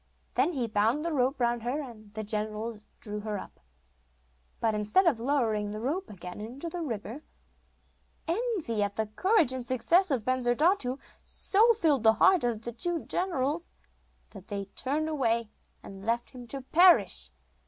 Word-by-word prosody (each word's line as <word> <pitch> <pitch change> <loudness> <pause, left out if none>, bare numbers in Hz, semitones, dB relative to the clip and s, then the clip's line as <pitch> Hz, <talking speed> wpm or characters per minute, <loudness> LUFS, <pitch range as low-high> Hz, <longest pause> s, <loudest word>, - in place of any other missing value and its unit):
Then 350 - +2
he 255 -5 -1
bound 225 +7 +1
the 335 - -1
rope 265 0 +1
round 240 -1 +1
her, 245 +6 -2
and 225 -7 -9
the 220 - -3
generals 215 +1 -3 0.2
drew 210 -1 -5
her 210 0 -3
up. - - -10 1.0
But 225 -1 +1
instead 210 - +2
of 295 -9 +3
lowering 230 -5 0
the 210 +1 -5
rope 310 - -2
again 180 0 -8
into 255 +10 -6
the 350 +1 -5
river, 235 -1 -5 1.1
envy 345 - -1
at 205 0 -1
the 220 - 0
courage 320 - +2
and 260 -1 -4
success 260 +10 +3
of 250 -7 0
Bensurdatu 255 - +2 0.3
so 440 +4 +3
filled 315 - +2
the 220 0 +6
hearts 370 +1 +4
of 230 -2 -2
the 240 - -4
two 340 +7 -2
generals, 335 -2 -1 0.6
that 195 -3 -12
they 200 -1 -4
turned 295 +4 -1
away 235 -7 0 0.3
and 195 0 -10
left 235 +2 -1
him 250 -3 -10
to 270 +3 -6
perish. 350 +6 +5
245 Hz, 165 wpm, -29 LUFS, 220-315 Hz, 1.1 s, the